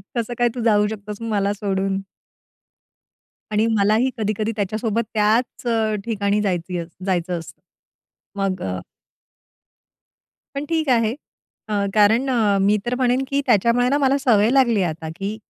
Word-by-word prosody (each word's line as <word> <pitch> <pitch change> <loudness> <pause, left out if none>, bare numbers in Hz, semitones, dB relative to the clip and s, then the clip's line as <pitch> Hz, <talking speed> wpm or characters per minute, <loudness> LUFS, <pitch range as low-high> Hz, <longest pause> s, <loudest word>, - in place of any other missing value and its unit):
कसं 235 0 -2
काय 240 0 +3
तू 245 - -3
जाऊ 210 -2 +3
शकतोस 210 0 -7
मला 205 -3 0
सोडून? 195 -1 -1 1.5
आणि 215 +1 +2
मलाही 215 +6 +3
कधी-कधी 215 0 -1
त्याच्यासोबत 215 +2 -1
त्याच 220 +4 +1
अ, 225 -2 +1
ठिकाणी 205 -2 0
जायचंही 180 -3 -2 0.2
जायचं 180 -2 -1
असतं. 165 - -13 0.8
मग 195 -2 -1
अ 90 -1 -3 1.8
पण 280 +1 -3
ठीक 320 -3 0
आहे 230 -3 +3 0.6
अ, 210 - -2 0.2
कारण 225 +6 +4
अ, 220 -6 +2
मी 205 +2 +3
तर 245 +1 -1
म्हणेन, 255 +1 +1
की 280 +1 0
त्याच्यामुळे 235 +2 +3
ना 285 - +2
मला 275 -1 +2
सवय 225 -5 +3
लागली 245 -6 +3
आहे 180 - +1
आता, 160 0 -7
की 200 +4 -4
215 Hz, 145 wpm, -21 LUFS, 200-240 Hz, 1.8 s, कारण